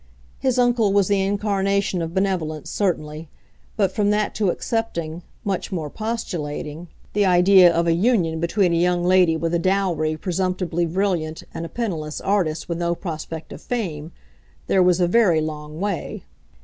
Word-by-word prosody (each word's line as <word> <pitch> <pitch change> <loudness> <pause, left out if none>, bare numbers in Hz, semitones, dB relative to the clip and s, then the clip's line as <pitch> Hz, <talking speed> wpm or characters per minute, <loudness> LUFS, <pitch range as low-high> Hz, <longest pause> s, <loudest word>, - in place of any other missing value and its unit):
His 260 -2 0
uncle 240 -4 +3
was 200 -2 +3
the 200 -1 +2
incarnation 200 -1 0
of 165 0 -3
benevolence, 175 -6 -1
certainly; 155 -5 -2 0.5
but 195 -4 +2
from 205 +1 +1
that 210 0 +1
to 205 -4 +1
accepting—much 180 -3 -3
more 160 -6 -3
postulating—the 175 -4 -4
idea 180 -1 +6
of 170 0 +1
a 165 - +3
union 175 -4 +1
between 175 +1 +1
a - - +2
young 175 0 +2
lady 180 -3 +4
with 165 +1 -2
a 170 - +2
dowry 175 -4 0
presumptively 180 -1 -1
brilliant 170 -3 -1
and 165 - -4
a - - -16
penniless 165 -10 -3
artist 185 -6 0
with 170 -1 -3
no 170 0 0
prospect 160 -2 -6
of - - -10
fame, 170 -10 -4 0.5
there 190 - +3
was 180 -1 +4
a 175 - +3
very 180 -4 +4
long 155 0 -5
way. 200 -3 -3
180 Hz, 155 wpm, -22 LUFS, 165-200 Hz, 0.5 s, idea